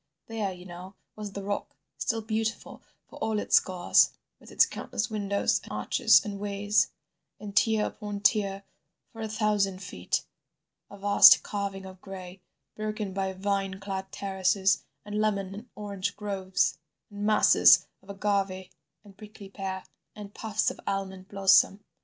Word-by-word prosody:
There, 220 -4 -3
you 180 0 -11
know, 180 +2 -10 0.2
was 210 -2 -7
the 200 - -6
rock, 200 +1 -4 0.2
still 225 -2 -1
beautiful 220 0 -3 0.3
for - - -13
all 220 -1 -1
its - - +4
scars, 185 -2 +3 0.3
with - - -16
its - - +5
countless 220 +2 -4
windows 200 -2 0
and - - -13
arches - - +3
and 200 -1 -5
ways, 205 +1 +1 0.6
tier 220 0 +3
upon 205 -2 -6
tier, 200 -2 +1 0.5
for 225 - -9
a 220 - -2
thousand 210 -3 0
feet, 90 - -3 0.6
a 200 - -11
vast 200 +1 +7
carving 200 -2 -4
of 185 -1 -12
gray, 185 -1 -9 0.3
broken 215 -2 -4
by 190 0 -1
vine 195 0 -2
clad 195 -1 -5
terraces, 195 0 +1 0.2
and 210 +1 -2
lemon 200 -3 -1
and 220 +5 -10
orange 200 -1 -4
groves, 190 -4 -1 0.3
and 205 0 -6
masses 215 0 +6 0.2
of 195 - -22
agave 195 -2 -2 0.3
and 200 -2 -16
prickly 210 -2 -12
pear, 190 -1 -5 0.3
and 205 -1 -10
puffs 220 -1 -1
of - - -12
almond 190 -1 -3
blossom. 195 0 +4
200 Hz, 145 wpm, -28 LUFS, 190-210 Hz, 0.6 s, vast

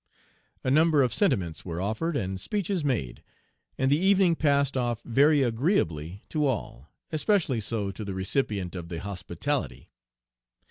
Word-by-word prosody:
A 130 - 0
number 155 0 +4
of 125 - 0
sentiments 95 - +1
were 85 -2 -5
offered 110 - -1
and 95 -4 -3
speeches 195 - -2
made, 115 - -2 0.6
and 130 +1 +1
the 145 - +4
evening 190 -2 +4
passed 140 -3 +2
off 120 -3 -1
very 140 +4 +4
agreeably 105 - 0
to 150 -2 +1
all, 95 - -4 0.2
especially 155 - +1
so 105 -2 -2
to 100 +3 -7
the 100 -2 -5
recipient 95 -1 -1
of 85 -2 -7
the 85 -2 -5
hospitality. 95 - -4
120 Hz, 145 wpm, -27 LUFS, 95-150 Hz, 0.6 s, number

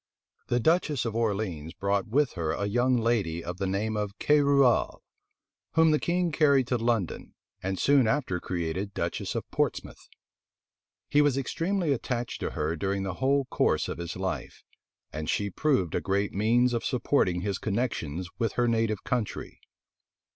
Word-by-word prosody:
The 120 - +1
duchess 155 -2 +2
of 115 -1 -3
Orleans 100 -8 -2
brought 100 0 0
with 135 +4 +2
her 80 -4 -2
a 100 - -2
young 120 +5 +2
lady 105 -8 0
of 90 +1 -6
the 95 - -1
name 105 +3 -1
of 105 -1 -3
Querouaille, 140 -4 +3 0.8
whom 160 -1 +5
the 150 - +3
king 175 0 0
carried 140 -4 +4
to 125 - +2
London, 115 -6 -1 0.3
and 95 0 -2
soon 135 0 +4
after 115 -8 0
created 90 +3 -3
duchess - - -3
of - - -3
Portsmouth. - - -2 1.0
He 145 - +4
was 145 -3 +2
extremely 165 +4 0
attached 120 -1 -3
to - - -2
her 75 +2 -2
during 95 +4 -1
the 95 -2 -3
whole 135 +1 +2
course - - +1
of - - -5
his 85 0 -5
life; 95 0 -4 0.5
and 75 0 -4
she 100 -1 0
proved 130 - +1
a - - 0
great 100 +1 0
means 120 +5 +3
of 120 - -1
supporting 115 -8 +1
his 100 -1 -2
connections 95 - -2
with 115 -2 0
her 120 0 +1
native 115 -3 0
country. 120 -4 -3
110 Hz, 160 wpm, -28 LUFS, 95-135 Hz, 1.0 s, whom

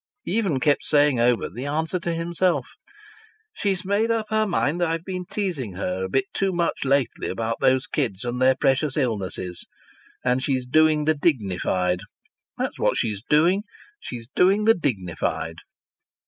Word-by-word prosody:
He 185 - -2
even 195 -12 +1
kept 145 +1 +2
saying 145 -4 +3
over 120 -2 +2
the 125 +8 -6
answer 160 +5 -1
to 170 0 -2
himself: 170 +2 0 0.9
"She's 195 - -1
made 205 +4 +1
up 225 -1 +1
her 215 0 +2
mind 175 -2 0
I've 165 0 0
been 185 -2 -4
teasing 170 - -3
her 95 0 -3
a 95 - -3
bit 130 +6 +1
too 195 -1 0
much 170 -2 -1
lately 135 -1 +1
about 115 0 -2
those 130 +1 +3
kids 120 -8 -2
and 125 +1 -3
their 130 0 +5
precious 135 +2 +1
illnesses. 95 - -2 0.6
And 125 +1 +2
she's 130 -2 -1
doing 155 +3 +3
the 155 - +4
dignified. 95 - 0 0.6
That's - - -3
what - - +2
she's 105 -3 -1
doing! 170 - +3 0.4
She's 115 -2 -7
doing 195 - +3
the 225 - +7
dignified!" 105 - -2
145 Hz, 160 wpm, -24 LUFS, 120-175 Hz, 0.9 s, the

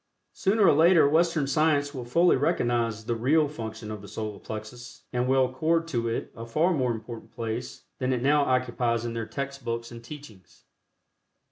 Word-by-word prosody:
Sooner 205 +1 +2
or 165 - +6
later 165 +1 +6
Western 160 0 +2
science 145 0 +1
will 125 -3 -6
fully 170 +9 +4
recognize 120 -4 0
the 120 - -1
real 145 +7 +2
function 110 -6 -7
of 105 -2 -6
the 100 - -11
Solar 105 -2 -5
Plexus, 120 +3 -9
and 125 0 0
will 130 0 +4
accord 160 +6 0
to 115 -5 -1
it 115 - -3
a 115 - -7
far 155 +10 +1
more 130 -6 +1
important 115 0 -7
place 115 +1 -5 0.2
then 130 0 0
it 125 -1 -1
now 145 +2 +4
occupies 120 -3 0
in 115 - -3
their 115 -1 -4
text 140 -1 -5
books 115 0 -4
and 115 0 -10
teachings. 115 -8 -13
125 Hz, 180 wpm, -27 LUFS, 115-150 Hz, 0.2 s, or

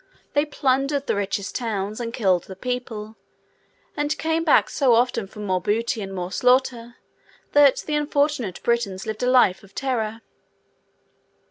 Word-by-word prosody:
They 290 +1 +3
plundered 275 0 0
the - - 0
richest 200 0 -2
towns, 215 -3 -3
and 230 -1 -4
killed 190 -7 +1
the 190 - -9
people; 225 -1 -5 0.8
and 295 +1 -1
came 320 +1 0
back 315 - +4
so 260 -5 +3
often 235 -3 +1
for 210 +2 -11
more 185 -3 -1
booty 225 +3 -1
and 195 -1 -6
more 180 -1 -4
slaughter, 245 0 +1 0.6
that 290 -2 +5
the 305 - -3
unfortunate 290 - 0
Britons 225 -6 -1
lived 220 -1 -5
a 250 - +2
life 245 -8 +4
of 195 - -19
terror. 230 -4 -2
235 Hz, 150 wpm, -23 LUFS, 205-270 Hz, 0.8 s, that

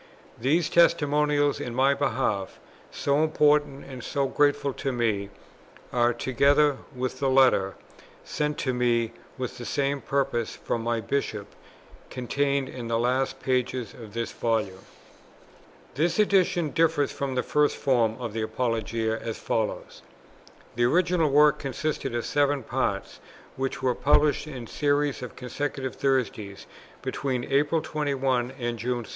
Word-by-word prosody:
These 155 +7 +2
testimonials 150 -3 +3
in 120 - -5
my 135 +2 +4
behalf, 115 -8 -1 0.3
so 140 +2 +1
important 150 -2 +2
and 130 -3 -9
so 140 -1 -1
grateful 145 0 +1
to 135 - -3
me, 110 -5 0 0.6
are, 120 0 +3
together 140 +4 +3 0.2
with 125 0 -3
the 135 - +1
Letter, 130 -8 +4 0.5
sent 150 0 -2
to 130 - +1
me 120 -2 +1 0.3
with 130 -1 -5
the - - -6
same 140 +2 -1
purpose, 135 -4 -1
from 115 - -3
my 115 0 -1
Bishop, 105 -3 -3 0.6
contained 140 +2 -1
in 120 -2 -7
the 115 0 0
last 125 +3 0
pages 125 -3 -1
of 110 -2 -12
this 115 -1 -2
Volume. 110 -5 -1 1.1
This 165 +4 0
Edition 185 -6 +2
differs 160 -2 +2
from 135 -2 -3
the 125 - +1
first 150 0 +2
form 120 -5 +2
of 120 -4 -5
the 110 - -2
Apologia 115 -1 -1
as 115 -1 -5
follows: 110 -2 -3 0.7
The 120 - +1
original 170 +3 +3
work 150 +1 +5
consisted 140 -2 -3
of 120 - -2
seven 145 -2 +1
Parts, - - -2 0.4
which 135 0 -3
were 130 -1 +3
published 145 +2 +2
in 130 -5 -7
series 145 +2 0
on 125 - -5
consecutive 130 +1 -4
Thursdays, 115 -7 -1 0.4
between 130 -3 -2
April 145 +4 +1
21 135 -4 0
and 120 -1 -3
June 120 +1 -2
2. - - -13
130 Hz, 140 wpm, -26 LUFS, 120-145 Hz, 1.1 s, work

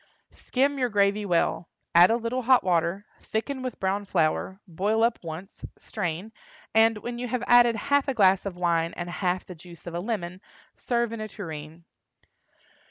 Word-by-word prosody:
Skim 275 +2 -1
your 250 -1 +1
gravy 205 0 +1
well; 170 -1 0 0.2
add 175 +2 +8
a 225 - +3
little 240 +2 -2
hot 255 +1 +4
water, 180 +2 0
thicken 260 +5 -3
with 255 -2 -5
brown 195 +2 0
flour, 190 +1 0
boil 205 +6 0
up 230 0 +2
once, 170 +4 -8
strain, 185 +1 -4 0.4
and, 225 0 +4
when 240 +3 -6
you 250 - -3
have 245 0 -2
added 240 -1 +6
half 285 +5 +1
a 270 - -1
glass 195 -3 +4
of 200 -3 -5
wine 170 -2 +1
and 175 0 -5
half 180 0 -1
the 180 - -9
juice 170 0 -15
of 175 - -7
a 170 - -2
lemon, 185 -3 -4 0.3
serve 235 -2 -1
in 225 - -5
a 215 - -4
tureen. 165 -5 -8
200 Hz, 175 wpm, -26 LUFS, 175-235 Hz, 0.4 s, add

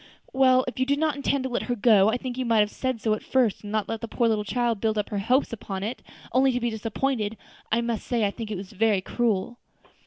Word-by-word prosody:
"Well, 260 -1 +4
if 255 - -5
you 260 - +1
did 280 +1 +2
not 310 -1 +1
intend 280 -1 0
to 260 - -2
let 240 - 0
her 245 - +1
go, 210 -2 +5
I 230 - +1
think 250 -1 -5
you 260 - -2
might 230 -3 +3
have 210 0 0
said 260 -3 -2
so 215 -1 +1
at 215 - -3
first, 250 -6 +1
and 205 - -8
not 215 -1 0
left 225 - -4
the 230 - -4
poor 225 -2 +1
child 235 +1 0
to - - -17
build 210 -1 -2
her 205 - -2
hopes 250 +5 +1
upon 195 -3 -5
it, 225 +5 -4 0.3
only 260 +1 +4
to 245 - 0
be 240 -1 -1
disappointed. 225 0 -2 0.3
I 230 +2 +3
must 235 -2 -3
say 235 -3 +1
I 200 - 0
think 225 0 -7
it 210 - -3
was 190 +2 -9 0.3
cruel." 235 0 -1
235 Hz, 255 wpm, -25 LUFS, 215-255 Hz, 0.3 s, go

